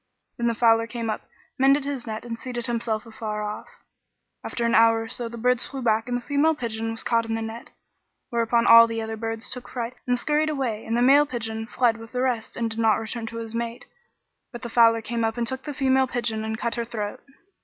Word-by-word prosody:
Then 235 - +1
the 230 - +1
fowler 230 0 +4
came 230 -2 -3
up, - - -6 0.3
mended 275 +1 +4
his 275 -4 -4
net 220 +1 -5
and 230 -1 -5
seated 245 -1 -5
himself 230 -2 -2
afar 215 -2 -5
off. 210 0 -5 0.8
After 235 - -2
an 235 - +1
hour 225 0 +5
or - - -7
so 235 +1 -4
the 235 - -8
birds 250 +1 +1
flew 270 -2 -6
back 225 0 +2
and 245 0 0
the 245 - -9
female 300 +3 +2
pigeon 225 -4 -3
was 225 - -3
caught 230 -1 +1
in 225 - -1
the 225 - -3
net; 225 +1 -7 0.6
whereupon 235 0 +2
all 230 0 +9
the 225 0 -3
other 220 0 -4
birds 225 +1 -4
took 250 -1 -6
fright 240 -1 -4
and 245 0 +2
scurried 300 +4 +1
away; 255 -7 -2
and 230 +1 0
the 240 - +3
male 285 +3 +6
pigeon 225 -3 -4
fled 240 -2 +2
with 225 +1 -12
the 250 - -1
rest 245 -4 -1
and 230 -1 -1
did 225 - -4
not 220 -2 +4
return 225 +1 -5
to 230 - -7
his 225 -1 -6
mate, 235 0 -4 0.7
but 240 -1 -9
the 235 - -4
fowler 230 -1 +5
came 230 +1 -2
up 225 +1 -1
and 235 - 0
took 260 +2 -5
the 295 - -3
female 265 -1 +3
pigeon 235 -3 -1
and 220 0 -3
cut 235 -1 -2
her 235 +1 -2
throat. 215 -3 -5
230 Hz, 240 wpm, -25 LUFS, 225-245 Hz, 0.8 s, all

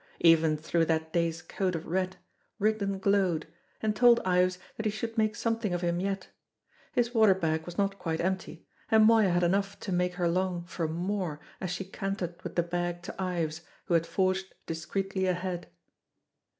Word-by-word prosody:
Even 165 -2 +5
through 165 +2 +1
that 160 0 -1
day's 170 0 0
coat 185 +2 -1
of 165 - -4
red, 185 +2 -1 0.4
Rigden 205 -2 +1
glowed, 190 -5 +2 0.4
and 215 -1 +1
told 240 +1 +6
Ives 180 0 +2 0.2
that 220 - -2
he - - +1
should 225 +2 -4
make 215 -2 +2
something 225 -4 -1
of 175 - -2
him 175 0 0
yet. 195 0 -2 0.6
His 240 0 +1
water 220 -5 +6
bag 160 -3 -1
was 175 - -7
not 200 -1 0
quite 160 -1 -2
empty, 185 -2 -2 0.2
and 220 -1 +6
Moya 220 -3 +6
had 175 0 +2
enough 195 +3 +1
to 195 - -4
make 180 0 +1
her 175 -1 +1
long 180 0 0
for 170 -2 -3
more 175 -1 -2 0.2
as 185 - -3
she 180 +2 -3
cantered 190 -2 -4
with - - -7
the 175 - +3
bag 175 0 -2
to 190 - -6
Ives, 170 -4 -2 0.2
who - - -1
had 165 0 +3
forged 190 0 0
discreetly 190 +4 -2
ahead. 180 -1 -2
185 Hz, 180 wpm, -29 LUFS, 170-195 Hz, 0.6 s, told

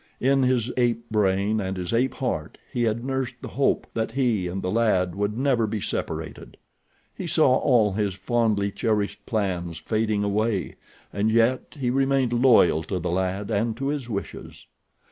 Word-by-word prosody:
In 135 +1 +3
his 125 -2 +1
ape 120 -1 +1
brain 105 0 +1
and 95 -1 -3
his 90 +1 -3
ape 125 +3 +1
heart 85 - -3 0.2
he 120 -1 +1
had 115 +2 -1
nursed 130 -2 -2
the - - -7
hope 140 +1 +1
that 110 0 -2
he 120 -9 +1
and 95 +2 -4
the 90 - -1
lad 95 -5 +2
would 105 +3 -2
never 125 -4 +2
be 105 0 -3
separated. - - -5 0.6
He 185 - -6
saw 145 -6 +4
all 115 -7 +3
his 100 -2 -1
fondly 100 0 0
cherished 105 -1 -1
plans 90 -7 -2
fading 110 +4 -1
away, 105 -1 0 0.4
and 100 +3 +1
yet 115 +6 +1
he 125 -3 0
remained 135 -2 +1
loyal 120 -10 +5
to 95 - -3
the 90 -1 -2
lad 95 +3 -2
and 110 +2 0
to 135 +1 -2
his 140 -4 -3
wishes. 100 -3 -6
110 Hz, 170 wpm, -25 LUFS, 100-125 Hz, 0.6 s, loyal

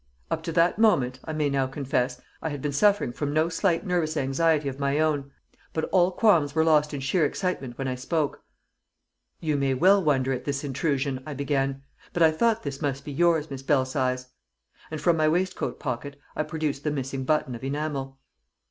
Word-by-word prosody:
Up - - 0
to 165 - -4
that 170 +4 +3
moment, 130 - +3
I 160 - -4
may 155 -1 +1
now 135 -2 +1
confess, 130 -2 -1 0.2
I 160 - -2
had 145 -2 -4
been 145 +2 -2
suffering 200 0 +3
from 145 +3 -3
no 155 +2 +2
slight 175 +1 0
nervous 170 -4 0
anxiety 145 +2 +1
of 135 0 -4
my 140 0 +1
own. 150 -3 +1 0.4
But 160 - -1
all 180 -1 +4
qualms 170 -8 +3
were 160 - +4
lost 150 -2 +3
in 145 -2 -4
sheer 155 +6 +1
excitement 145 -6 -2
when 135 - -3
I 130 - -1
spoke. 145 +4 -2 1.0
"You 155 -3 0
may 135 -1 +1
well 190 +7 +5
wonder 135 -3 +2
at 125 - -4
this 140 0 -2
intrusion," 140 -1 -1
I 150 - -5
began. 135 -1 -1 0.3
"But 175 - +3
I 160 - +6
thought 225 +7 +1
this 140 0 -5
must 140 -2 -2
be 145 - -5
yours, 160 0 +2
Miss 135 -1 -5
Belsize." 130 -2 0 0.6
And 155 - -5
from 170 +2 +3
my 155 -1 +3
waistcoat 180 +4 -1
pocket 140 +1 -4 0.2
I - - 0
produced 155 -2 -3
the 150 - 0
missing 135 -2 -3
button 140 -2 +1
of 120 - -8
enamel. 135 -1 -3
145 Hz, 195 wpm, -26 LUFS, 135-160 Hz, 1.0 s, I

